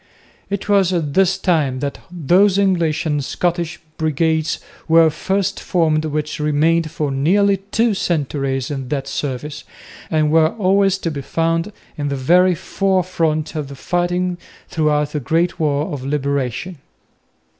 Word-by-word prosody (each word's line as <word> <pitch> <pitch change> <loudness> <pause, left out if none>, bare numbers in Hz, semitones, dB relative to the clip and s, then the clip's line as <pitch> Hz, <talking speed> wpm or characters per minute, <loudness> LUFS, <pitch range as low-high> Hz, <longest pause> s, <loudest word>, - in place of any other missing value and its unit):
It 200 0 -3
was 200 -3 +3
at 160 -6 -1
this 190 +1 +3
time 155 -9 +1
that 140 -1 -3
those 180 +4 +3
English 175 -6 +1
and 145 -2 0
Scottish 170 +4 -2 0.2
Brigades 160 +1 +1 0.3
were 165 -1 +5
first 195 +4 -1
formed 160 -3 +1
which 150 0 -3
remained 155 +2 +2
for 150 -2 -2
nearly 195 +9 +3
two 225 +1 +2
centuries 140 -7 -1
in 135 -3 -4
that 135 -2 -2
service, 145 +2 -4 0.5
and 155 -1 +1
were 160 0 +3
always 195 -2 +2
to 170 -3 -3
be 140 -2 -5
found 165 +6 -1 0.3
in 145 - -1
the 140 - -1
very 175 +7 +4
forefront 180 -4 0
of 150 -3 -4
the 140 - -9
fighting 175 +4 -1 0.3
throughout 150 -3 +1
the 150 - -2
great 165 +6 0
war 150 -1 0
of 135 -3 -5
Liberation. 140 +3 -2
160 Hz, 145 wpm, -19 LUFS, 145-180 Hz, 0.5 s, were